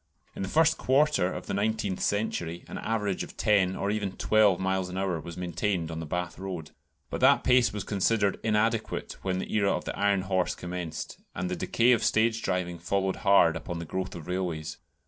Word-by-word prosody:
In - - -5
the 95 - -2
first 160 +3 +3
quarter 135 -8 +3
of - - -6
the - - -4
nineteenth 105 -1 -1
century 90 -5 -1
an - - -6
average 105 -4 -1
of - - -7
ten 95 -3 +3
or 100 - -1
even 105 -3 -2
twelve 105 -4 +4
miles 95 -1 0
an 90 - -5
hour 95 -3 -1
was 85 +1 -9
maintained 90 -1 -2
on 80 - -5
the 80 - -5
Bath 90 +3 -3
Road. 90 -5 -6 0.4
But - - -3
that - - +5
pace 125 -4 +4
was 105 -1 -4
considered 100 0 +1
inadequate 110 +1 0
when 95 -1 -1
the 95 - -4
era 100 -2 +3
of - - -2
the - - -4
"iron 100 -1 +2
horse" 95 -1 0
commenced, 90 -2 -6 0.2
and 90 0 -3
the - - 0
decay 120 +6 +2
of 115 -3 +3
stage 115 +1 +2
driving 90 -3 -2
followed 95 +3 -1
hard 100 -5 +5
upon 85 -2 -5
the 85 - -5
growth 95 +3 -4
of 80 -3 -8
railways. 90 -4 -3
95 Hz, 205 wpm, -28 LUFS, 90-105 Hz, 0.4 s, that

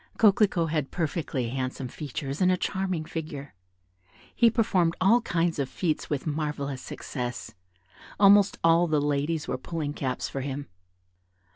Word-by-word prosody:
Coquelicot 195 -6 +4
had 150 -4 -1
perfectly 155 -7 -2
handsome 130 +1 -3
features 140 +2 -5
and 185 0 +5
a 185 - +2
charming 185 -4 -2
figure. 155 - -6 0.8
He 235 - +5
performed 190 -7 +2
all 225 +6 +5
kinds 170 -6 0
of 135 -2 -1
feats 165 -5 -2
with 145 -3 -2
marvellous 145 -3 -3
success; 125 -4 -5 0.7
almost 200 0 +6
all 165 +1 +5
the 155 -2 +2
ladies 145 +2 -1
were 130 - -2
pulling 150 -1 -4
caps 130 -3 -2
for 135 - -4
him. 140 +1 -4
155 Hz, 140 wpm, -27 LUFS, 140-175 Hz, 0.8 s, almost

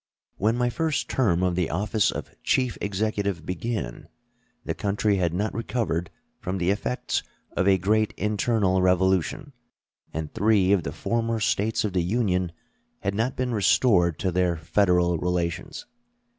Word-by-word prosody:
When 110 +4 +1
my 120 0 +1
first 160 +1 -1
term 95 -9 +2
of 90 -1 +2
the 90 -2 0
office 105 +5 +1
of - - -5
Chief 130 -3 +1
Executive 100 -4 -1
began, 90 - -4 0.6
the - - -1
country 100 0 0
had 90 -3 +1
not 100 +5 -1
recovered 110 -7 -2 0.3
from 95 +1 -3
the 90 +1 +1
effects 110 +5 -1 0.3
of 95 - +1
a 95 -1 +5
great 105 +4 +1
internal 105 -2 +1
revolution, 95 - +1 0.6
and 80 -1 -5
three 100 -2 +3
of 100 -3 +4
the - - -4
former 115 -1 -1
States 105 +1 +1
of 100 - -2
the 90 - +2
Union 90 -2 0 0.5
had 100 - -1
not 115 +5 -1
been 125 -1 -1
restored 95 - +3
to 95 -3 -1
their 90 -1 +1
Federal 90 0 +2
relations. 90 -1 -2
100 Hz, 150 wpm, -25 LUFS, 90-110 Hz, 0.6 s, a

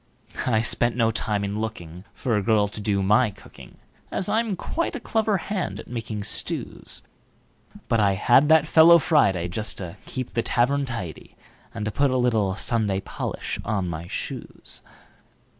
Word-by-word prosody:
I 110 -3 +2
spent 120 +1 +1
no 115 -2 +2
time 105 -2 -1
in 100 +1 -3
lookingFor 105 +2 -4
a 105 - +2
girl 105 0 +3
to 105 +1 -8
do 100 -1 0
my 105 +5 +4
cooking, 100 - -15 0.3
As 190 - -1
I'm 220 0 +1
quite 330 - -3
a - - -3
clever 220 -2 0
hand 185 +2 -3
at - - -10
making 115 -3 -5
stews; - - -1 0.8
But 115 - +2
I 100 -2 +3
had 125 +9 +4
that 160 -1 +6
fellow 165 +2 +7
Friday, 100 - +2
Just 105 +5 -3
to 90 -3 -6
keep 130 -2 -5
the 115 - +1
tavern 135 +5 +1
tidy, 100 -11 -7 0.4
And 105 -2 -5
to 110 - -1
put 140 +5 +2
a 115 -6 +1
Sunday 105 -5 0
polish - - -5
on 100 -4 -1
my 85 0 -5
shoes. - - -6
110 Hz, 160 wpm, -24 LUFS, 100-135 Hz, 0.8 s, fellow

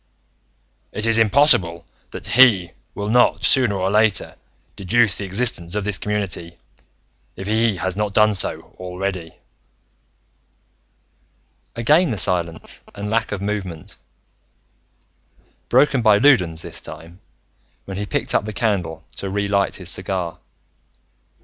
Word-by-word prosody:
"It 105 - -3
is 115 0 +3
impossible 105 - +4 0.2
that - - -9
He 110 -9 +4 0.2
will 105 - -4
not, 120 +3 +2
sooner 125 -6 +3
or 95 0 -1
later, 105 -2 +1 0.4
deduce 105 +2 +1
the 100 - -5
existence 95 -3 0
of 105 - -1
this 100 -2 -2
community, 95 -5 -3 0.8
if 95 - -8
He 110 +1 +1
has 95 0 -3
not 105 0 -2
done 110 0 +4
so 95 - -4
already." 90 -2 -5 2.4
Again 150 +9 +3
the 110 - -3
silence 85 -3 -2
and 105 +1 -5
lack 115 0 0
of 100 -2 -4
movement, 95 -6 -5 1.7
broken 140 -3 +3
by 110 -3 +5
Loudons 90 - +3
this - - -6
time, 85 +3 -11 0.7
when 95 -1 -7
he 105 0 -4
picked - - -1
up - - +1
the 110 - -6
candle 95 -9 -2
to 100 - -4
re 100 +1 -2
lit 100 -1 0
his 90 -2 -5
cigar. 90 -2 -3
100 Hz, 130 wpm, -20 LUFS, 90-110 Hz, 2.4 s, by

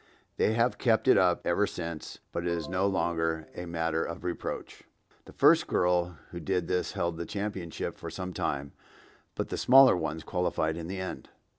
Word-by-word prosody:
They 110 - +3
have 115 +2 +1
kept 115 0 +2
it - - +7
up 90 -1 +3
ever 100 +4 +2
since, 85 -2 -6
but - - -2
it 85 - -2
is 85 -3 -2
no 90 +2 +1
longer 80 -3 0
a 90 - -6
matter 80 -1 -1
of 85 - -6
reproach.) 90 -1 -5 0.4
The - - -12
first - - +5
girl 90 -1 +1
who 85 - -6
did 90 0 -1
this 90 - -1
held 85 -1 -1
the 85 - -4
championship 100 -5 -4
for - - -6
some 90 -1 -5
time, 70 -3 -2 0.6
but - - -3
the - - -3
smaller 130 -1 +7
ones 80 -2 -3
qualified 80 -3 -1
in 85 -1 -6
the 95 +2 -4
end. 95 - -6
85 Hz, 185 wpm, -29 LUFS, 80-95 Hz, 0.6 s, it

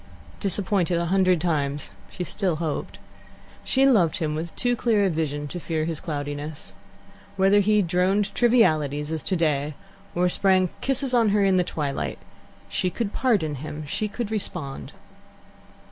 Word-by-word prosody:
Disappointed 190 -3 0
a 170 - 0
hundred 185 0 +3
times, 145 -4 -1 0.2
she 180 - -5
still 185 -1 -1
hoped. 155 -2 -3 0.7
She 270 +1 +3
loved 195 - +4
him 155 -3 -1
with 160 +2 -5
too 245 -1 +1
clear 220 -3 +2
a 190 - +2
vision 145 -2 -2
to 175 - -5
fear 160 -2 -2
his 165 -2 -3
cloudiness. 145 +3 -5 0.6
Whether 195 +1 +4
he 210 +1 +3
droned 185 +4 +1
trivialities, 155 - +2
as 160 -1 -2
today, 150 -5 0 0.4
or 180 +1 +3
sprang 185 0 +3
kisses 270 -1 -1
on 230 -3 +4
her 205 0 +3
in 190 -1 +3
the 180 - +3
twilight, 145 -5 -3 0.5
she 185 - -1
could 210 +2 -3
pardon 205 - +1
him, 155 0 -6
she 210 +8 -2
could 220 +1 -4
respond. 175 -10 -4
180 Hz, 150 wpm, -25 LUFS, 155-205 Hz, 0.7 s, loved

